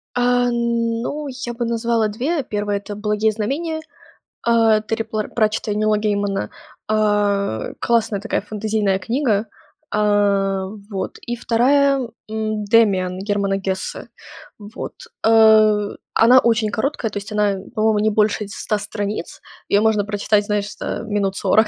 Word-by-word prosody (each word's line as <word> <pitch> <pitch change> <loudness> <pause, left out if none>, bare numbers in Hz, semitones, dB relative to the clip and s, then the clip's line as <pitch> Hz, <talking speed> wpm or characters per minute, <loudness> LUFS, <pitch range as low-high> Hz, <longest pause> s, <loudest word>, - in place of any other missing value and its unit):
А 245 0 +2
ну, 235 +4 -1
я 255 -2 -5
бы 240 0 -3
назвала 230 -1 +1
2: 265 +8 -2
1 205 -2 -2
это 205 +1 -7
"Благие 210 +1 +1
знамения", 300 +10 -3 0.6
а, 225 -2 +4
Терри 225 +1 -2
Пла 215 -1 -3
Пратчетта 215 -1 0
и - - -1
Нила 215 0 +2
Геймана. 205 -2 -1 0.4
А, 205 - +1
классная 225 -3 +1
такая 225 - -2
фэнтезийная 210 -1 -1
книга. 225 0 0 0.4
А, 200 -2 +2 0.2
вот, 190 -3 -4
и 240 - -4
2, 275 +4 +3 0.3
м, 215 -1 -2
"Демиан" 200 -5 +3
Германа 200 -1 0
Гессе. 190 -1 -4 0.5
Вот, 210 +3 -7 0.3
э, 215 -2 +5 0.2
она 245 +3 +6
очень 225 -3 +2
короткая. 225 0 -2
То - - -5
есть 205 +1 -7
она, 210 -1 +1 0.2
по-моему, 215 -1 +2
не 215 +1 +2
больше 210 0 +1
ть 200 - -11
100 215 - -2
страниц. 205 -2 -5 0.3
Её 205 +1 +4
можно 220 -2 +2
прочитать, 205 0 +1
знаешь, 205 -1 -2
за, - - -7 0.2
э, - - -8
минут 205 -3 -1
40 220 0 +3
215 Hz, 145 wpm, -20 LUFS, 205-230 Hz, 0.6 s, она